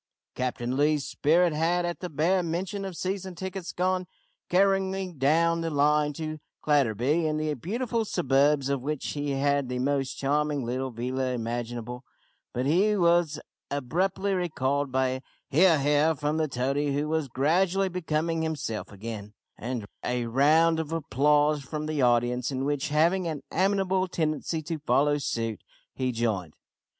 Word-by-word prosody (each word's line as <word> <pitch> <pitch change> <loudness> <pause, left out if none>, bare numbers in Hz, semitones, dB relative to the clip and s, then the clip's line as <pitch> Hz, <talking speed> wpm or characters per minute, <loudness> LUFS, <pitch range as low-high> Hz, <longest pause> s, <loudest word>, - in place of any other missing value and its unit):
Captain 125 -1 -2
Lee's 145 0 +2
spirit 170 +3 +2
had, 170 +3 +1
at 175 0 -3
the 180 - -5
bare 170 +5 +2
mention 185 +4 -3
of 185 -3 -6
season 190 -1 -3
tickets, 190 0 -5
gone 185 0 0 0.4
careering 190 -2 +1
down 165 +4 +3
the 165 - -1
line 150 0 +2
to 155 +1 -5 0.2
Clatterby, 145 +2 +2
in 155 0 0
the 155 0 -1
beautiful 230 - -2
suburbs 140 -6 +2
of 140 -2 -1
which 150 +1 -3
he 145 0 -3
had 140 -1 +1
the 125 - -2
most 135 +1 0
charming 145 -1 0
little 130 +2 -2
villa 130 +2 -2
imaginable, 120 +1 -4 0.5
but 125 +1 -2
he 195 +8 +3
was 170 -4 +3 0.3
abruptly 180 +8 -1
recalled 145 -6 -1
by 130 0 +2
a 130 0 -3 0.3
"he 160 +7 +5
ar, 165 -3 +5
he 145 +1 +2
ar," 155 +2 +3
from 150 +1 -1
the 160 -1 +1
toady, 140 +2 -1
who 145 +1 0
was 160 -2 0
gradually 175 +9 +2
becoming 165 -2 -1
himself 150 -9 -3
again, 105 0 -7 0.2
and 120 -2 -4 0.2
a 125 -1 -1
round 155 +7 +4
of 160 -1 -4
applause 150 0 +2
from 150 +3 -5
the 155 -2 -1
audience, 120 0 +2
in 135 -1 -2
which, 145 0 -1
having 170 +5 +2
an 150 -4 -4
amiable 190 0 +1
tendency 160 -1 -2
to 160 +1 -4
follow 145 0 +2
suit, 115 -5 -3 0.3
he 130 -1 -1
joined. 110 -9 -2
150 Hz, 160 wpm, -27 LUFS, 130-170 Hz, 0.5 s, he